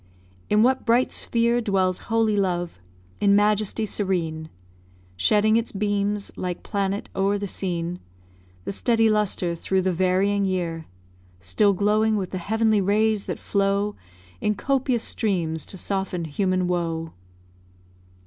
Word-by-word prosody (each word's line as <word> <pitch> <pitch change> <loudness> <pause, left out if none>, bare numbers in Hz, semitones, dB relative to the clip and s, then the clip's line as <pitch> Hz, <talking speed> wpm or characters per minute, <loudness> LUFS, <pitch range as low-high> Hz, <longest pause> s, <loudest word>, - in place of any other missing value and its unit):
In 210 +1 +4
what 260 +2 +2
bright 240 +2 +2
sphere 235 +1 +1
Dwells 190 -4 +1
holy 225 -2 +2
love, 175 - -1 0.4
in 200 -1 +4
majesty 210 +1 +2
serene 170 -7 -2 0.7
Shedding 210 - +3
its 230 0 -2
beams, 205 0 -1
like 180 -1 -4
planet 200 0 -2
o'er 195 +1 +1
the 200 - -4
scene; 180 -2 -3 0.7
The - - -2
steady 225 +1 +2
lustre 205 -4 0
through 190 +3 -1
the 185 0 +1
varying 190 +3 +2
year 175 -4 -2 0.5
Still 95 - +2
glowing 215 +3 +2
with 190 -3 -3
the 185 - -3
heavenly 220 +2 +1
rays 210 +1 +1
that - - -4
flow 200 +1 0 0.5
In 210 - +1
copious 260 0 0
streams 170 -8 -1
to 190 - -5
soften 190 -2 -2
human 185 +3 0
woe? 165 -2 -2
200 Hz, 130 wpm, -24 LUFS, 180-215 Hz, 0.7 s, In